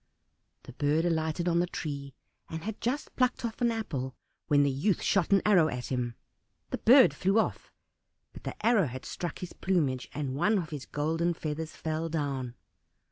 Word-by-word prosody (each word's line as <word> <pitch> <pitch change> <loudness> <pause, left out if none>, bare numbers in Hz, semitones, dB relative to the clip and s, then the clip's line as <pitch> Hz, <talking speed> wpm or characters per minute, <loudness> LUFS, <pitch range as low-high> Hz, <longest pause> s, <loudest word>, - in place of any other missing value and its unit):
The 130 - -11
bird 150 +4 +1
alighted 160 0 0
on 170 -1 +3
the 175 - +2
tree, 140 -5 -5 0.3
and 160 0 -5
had 220 0 -5
just 260 +5 -2
plucked 250 -1 +1
off 230 +1 -5
an 240 - +4
apple, 140 - -3 0.3
when 145 -1 +5
the 140 - +2
youth 165 +9 0
shot 195 -2 +2
an 195 - +5
arrow 185 -7 +5
at 125 -3 -4
him. 120 -2 -1 0.6
The - - -2
bird 255 +2 +7
flew 195 +3 +1
off, 225 - 0 0.6
but - - -12
the - - -6
arrow 220 -8 +4
had 130 +1 -7
struck 175 - -4
his 180 - -7
plumage, 145 -9 0
and 140 -2 -3
one 210 +9 +3
of 165 -5 -3
his 145 -3 -6
golden 165 +3 0
feathers 155 0 -4
fell 160 +1 -2
down. 135 -6 -2
160 Hz, 185 wpm, -29 LUFS, 140-195 Hz, 0.6 s, bird